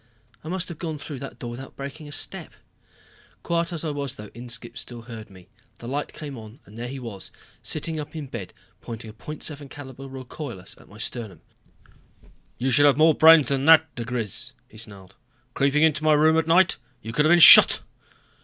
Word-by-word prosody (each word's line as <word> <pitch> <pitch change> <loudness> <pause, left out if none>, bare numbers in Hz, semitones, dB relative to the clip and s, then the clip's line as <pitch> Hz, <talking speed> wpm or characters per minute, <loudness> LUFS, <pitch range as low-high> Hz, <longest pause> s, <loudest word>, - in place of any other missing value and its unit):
I - - -10
must 185 +1 -3
have 170 - -9
gone 160 -3 -4
through 145 -1 -8
that 135 - -9
door 120 -2 -7
without 130 +3 -10
breaking 145 +2 -8
step. - - -3 0.9
Quiet 170 0 -1
as 170 -1 -5
I 155 - -1
was 140 -3 -4
though, 105 -1 -11
Inskipp 120 0 -7
still 120 -2 -7
heard 115 -2 -10
me. 95 -2 -16 0.3
The 120 - -10
light 145 +3 -3
came 145 -5 -8
on 110 +4 -13
and 105 - -16
there 120 +1 -6
he 135 +2 -7
was 115 -6 -8 0.3
sitting 155 +1 -3
up 150 +1 -8
in 155 -2 -5
bed 115 -8 -8 0.3
pointing 115 -1 -8
a - - -18
.75 145 +3 -7
caliber 135 -2 -10
recoilless 130 -6 -8
at - - -20
my 105 - -14
sternum. 110 -7 -5 1.2
"You 130 +2 -1
should 145 +4 +5
have 140 -2 +3
more 160 +1 +5
brains 160 -1 +6
than 135 0 -1
that, 160 -2 +6
diGriz," 120 -4 -4
he 110 - -14
snarled. 100 -3 -10 0.4
"Creeping 140 +2 +2
into 155 -1 +2
my 155 0 +4
room 155 +2 +4
at 160 0 +1
night! 175 +2 +4 0.3
You 115 - -7
could 150 +5 +2
have 155 - +4
been 175 - +7
shot." 170 - +10
140 Hz, 195 wpm, -24 LUFS, 115-155 Hz, 1.2 s, shot